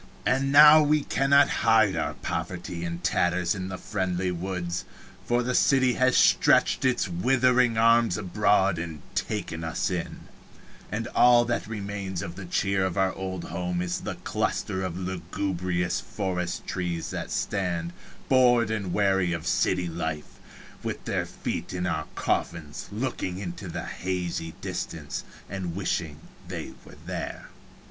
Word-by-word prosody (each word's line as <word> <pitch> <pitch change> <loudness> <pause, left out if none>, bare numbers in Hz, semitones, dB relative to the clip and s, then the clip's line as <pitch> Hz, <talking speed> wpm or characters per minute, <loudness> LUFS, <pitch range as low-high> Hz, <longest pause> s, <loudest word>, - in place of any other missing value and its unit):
And 135 +2 +2
now 150 +2 +9
we 150 0 +3
cannot 140 +1 +4
hide 110 -3 +4
our - - -2
poverty 85 -1 -4
and 85 0 -4
tatters 90 +2 +1
in 95 -2 -4
the 95 - -5
friendly 95 -2 -2
woods, 90 0 -3 0.4
for 120 0 +2
the 125 +1 -1
city 130 -1 +4
has 130 +1 +3
stretched - - +4
its 130 -5 +2
withering 125 +5 +3
arms 115 -3 +4
abroad 100 -2 +2
and 80 -3 -6
taken 80 0 -3
us 80 +3 -1
in, 90 -2 -4 0.7
and 110 +2 -2
all 120 -1 +5
that 120 -3 -2
remains 100 -3 -4
of 85 - -6
the 95 -1 -8
cheer 95 +2 +1
of 95 -1 -2
our 95 -1 +2
old 95 -1 -5
home 90 -1 -3
is 90 0 -2
the - - -4
cluster 95 - -2
of 90 -2 -3
lugubrious 90 -1 -2
forest 90 -3 -3
trees 90 -3 -3
that - - -4
stand, 85 -4 -2 0.3
bored 120 -3 +4
and 100 -5 -2
weary 95 -3 +2
of 85 -2 -4
a - - -6
city 90 -1 +1
life, 80 -2 -5 0.4
with - - -5
their - - -1
feet - - -4
in 90 0 -2
our 80 -3 -2
coffins, 80 -4 -2
looking 105 -5 -3
into 95 0 -6
the 80 - -5
hazy 90 -3 -3
distance - - -4 0.2
and 90 -3 -4
wishing 85 -5 -2 0.3
they - - -5
were - - -14
there. - - -5
95 Hz, 150 wpm, -26 LUFS, 85-110 Hz, 0.7 s, now